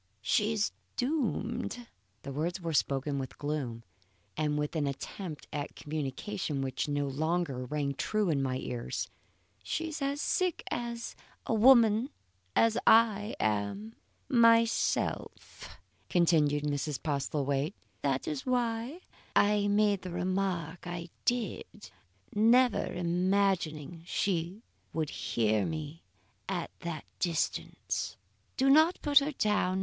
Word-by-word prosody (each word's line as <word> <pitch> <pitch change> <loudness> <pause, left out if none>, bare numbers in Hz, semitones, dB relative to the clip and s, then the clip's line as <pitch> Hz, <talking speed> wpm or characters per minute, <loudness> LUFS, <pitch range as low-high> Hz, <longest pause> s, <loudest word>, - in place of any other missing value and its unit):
"She's 210 - +2 0.3
doomed." 245 -3 -1 0.4
The 140 - -6
words 165 +6 -2
were 165 -2 -3
spoken 140 0 +1
with 130 - -6
gloom 140 -6 -3 0.5
and 150 -1 0
with 150 +2 -2
an 150 -3 +1
attempt 150 +4 -6
at 145 -1 -4
commiseration 150 +1 -3
which 130 +1 -2
no 145 -1 0
longer 150 -2 -1
rang 140 +1 -1
true 210 +5 0
in 140 -3 +1
my 130 -1 -1
ears. 125 -2 -4 0.5
"She 325 0 -2
is 315 -1 -6
as 280 +1 -1
sick 365 +2 0
a 235 -1 -5
woman 230 0 +6 0.5
as 225 -1 +4
I 220 -1 +5
am 110 - -1 0.3
myself," 230 -3 +2 0.3
continued 155 -4 +3
Mrs. 145 -1 -1
Postlethwaite. 140 +2 -1 0.3
"That 135 -2 0
is 150 -3 -2
why 245 +5 -1 0.3
I 205 0 +4
made 205 -1 +3
the 185 - -6
remark 180 -2 -2
I 175 0 -5 0.2
did, 240 -5 -2 0.4
never 235 +4 +4
imagining 175 -3 0
she 185 +3 -1 0.3
would 155 -2 -1
hear 110 -3 +1
me 155 0 -4 0.5
at - - -2
that 165 -3 -5
distance. 170 -3 -2 0.4
Do 270 - +3
not 315 +4 +5
put 290 -2 +7
her 290 +2 -2
down. 210 -6 +1
175 Hz, 115 wpm, -31 LUFS, 145-225 Hz, 0.5 s, put